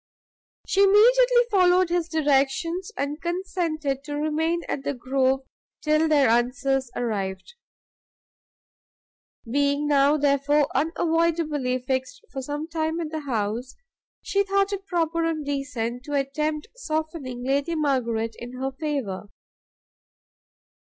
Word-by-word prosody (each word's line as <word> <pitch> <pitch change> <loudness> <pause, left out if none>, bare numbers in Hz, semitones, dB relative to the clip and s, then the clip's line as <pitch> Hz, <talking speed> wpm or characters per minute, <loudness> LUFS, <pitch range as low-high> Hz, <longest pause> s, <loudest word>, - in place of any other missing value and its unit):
She 395 - +2
immediately 485 +5 +6
followed 365 -2 +4
his 345 -1 0
directions, 315 +5 +1
and 290 +3 -3
consented 335 -6 -2
to 290 -1 -4
remain 320 +3 0
at 270 - -3
the 280 - -2
Grove 260 +1 +1 0.4
till 305 +1 +3
their 290 -4 +4
answers 250 +3 +1
arrived. 195 - -3 1.9
Being 285 +3 +1
now, 285 +1 +4
therefore, 285 0 +2
unavoidably 320 -4 +1
fixed 255 0 -3
for 270 - -4
some 290 +4 -4
time 320 0 -2
at 320 -2 -4
the 315 - -3
house, 225 +4 -2 0.5
she 400 - +1
thought 395 0 +1
it 390 0 -5
proper 335 -1 0
and 320 -2 -1
decent 260 -4 -3
to 290 - -6
attempt 300 +2 -1
softening 315 - -4
Lady 280 +5 0
Margaret 235 -7 0
in 240 +1 -8
her 265 +1 -3
favour. 265 -9 -4
290 Hz, 120 wpm, -25 LUFS, 265-330 Hz, 1.9 s, immediately